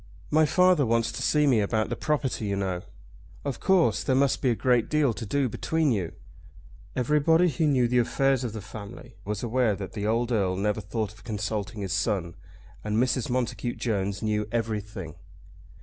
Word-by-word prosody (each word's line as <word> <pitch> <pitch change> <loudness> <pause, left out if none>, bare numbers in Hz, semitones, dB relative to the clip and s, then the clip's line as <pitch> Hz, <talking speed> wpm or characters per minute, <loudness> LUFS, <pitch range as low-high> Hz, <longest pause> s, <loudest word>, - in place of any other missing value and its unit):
"My 155 0 +4
father 180 -2 +4
wants 115 -1 +1
to - - -6
see 150 -1 +3
me 130 -6 +4
about 110 +1 0
the - - -2
property, 145 -7 -1
you 100 - 0
know." 95 -3 -2 0.6
"Of 140 -4 -3
course. 190 -3 +3
There 130 - +1
must 135 0 +2
be 130 - +2
a 120 - +2
great 125 -1 +2
deal 150 -5 +2
to 115 0 -7
do 140 +3 +1
between 160 +5 0
you." 95 -7 -1 0.8
Everybody 150 +6 +3
who 155 0 +1
knew 130 -4 +3
the 125 +1 +2
affairs 135 +2 +1
of 120 -4 -3
the 110 - -5
family 100 0 -10
was 105 +1 -3
aware 120 -2 +1
that 95 -1 -7
the 105 -1 -3
old 115 +2 0
Earl 95 -5 +1
never 105 +2 -1
thought 105 +1 -3
of 105 - -19
consulting 105 -1 -3
his 95 -2 -2
son; 95 -6 -1 0.5
and 105 0 -1
Mrs. 125 0 +1
Montacute 120 -1 -2
Jones 100 -4 -2
knew 105 -1 0
everything. 105 -6 -3
115 Hz, 185 wpm, -27 LUFS, 105-135 Hz, 0.8 s, My